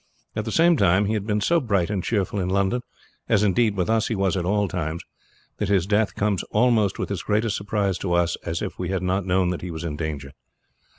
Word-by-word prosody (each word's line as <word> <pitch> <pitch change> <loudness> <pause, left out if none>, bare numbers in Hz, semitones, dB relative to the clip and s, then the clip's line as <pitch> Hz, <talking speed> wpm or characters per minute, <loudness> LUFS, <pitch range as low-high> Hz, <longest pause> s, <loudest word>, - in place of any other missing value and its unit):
At - - -2
the - - -3
same 170 0 +4
time, 100 -1 +3
he 105 - 0
had 105 -1 -2
been 105 -1 0
so 170 +11 +3
bright 100 - 0
and 95 -4 -1
cheerful 100 -2 -1
in 90 -1 -1
London, 100 +5 +1 0.5
as 105 -2 +3
indeed 105 +1 +2
with 90 - 0
us 115 0 +2
he 115 - -1
was 95 -1 +1
at 90 -2 -1
all 100 +2 +1
times, 85 -2 -3 0.5
that 105 - -2
his 95 -4 +3
death 105 +1 +1
comes 100 -2 0
almost 110 -3 +2
with - - -3
as 95 -3 -2
great 105 +2 0
a 110 - 0
surprise 100 -2 -1
to 90 -3 -2
us 85 0 +2
as 85 0 -3
if - - -6
we 90 -1 -2
had 95 -1 -1
not 95 +1 0
known 90 -1 +2
that 90 - -4
he 90 - -5
was 80 0 -6
in 80 -3 -3
danger. 75 -4 -4
100 Hz, 245 wpm, -24 LUFS, 90-105 Hz, 0.5 s, same